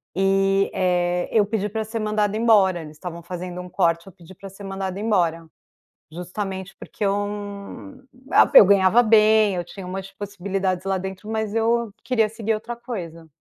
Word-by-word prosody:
E, 195 +1 +2
eh, 180 -1 +1
eu 215 -2 +4
pedi 210 -1 -2
pra 220 +1 -3
ser 220 +2 -6
mandada 215 0 0
embora, 200 -6 +4
eles 150 -1 -11
estavam 170 0 -8
fazendo 180 0 -6
um 180 - -9
corte, 170 0 +1
eu 190 - -12
pedi 175 +2 -15
para 195 +1 -10
ser 195 +2 -13
mandada 195 0 -4
embora. 170 -7 0 0.6
Justamente 190 +2 -6
porque - - -7
eu 195 - +2 1.2
a - - +6
Eu - - +11
ganhava 200 +3 +5
bem, 215 -2 +4
eu 175 - -2
tinha 185 +2 -10
umas 195 +1 -6
possibilidades 195 -2 -3
lá 195 -1 0
dentro 190 +2 -7
mas 220 -1 -2
eu 230 0 +1
queria 225 -4 +1
seguir 225 0 -2
outra 225 +2 -5
coisa. 180 -10 -7
195 Hz, 170 wpm, -23 LUFS, 180-215 Hz, 1.2 s, Eu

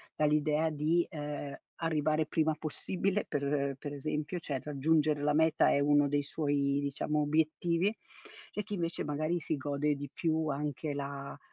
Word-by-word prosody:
dall'idea 150 +1 +2
di, 155 +3 +2
ehm, 145 -3 -5 0.3
arrivare 155 -1 +2
prima 155 0 +1
possibile 190 +6 -1
per 140 -1 0
per 145 +1 -6
esempio, 150 +4 -3
cioè 140 -4 -3
raggiungere 150 +1 +2
la 150 0 +2
meta 160 0 +4
è - - +3
uno 145 0 +4
dei 145 0 +1
suoi, 140 -1 0
diciamo, 145 +2 -1
obiettivi, 165 +6 +1 0.6
e 210 - -2
chi 205 - -7
invece 170 -3 -2
magari 155 +4 -1
si 155 - -1
gode 145 +1 0
di 145 0 -6
più 160 +1 0
anche 145 +1 -2
la 140 0 -5
150 Hz, 150 wpm, -32 LUFS, 145-160 Hz, 0.6 s, meta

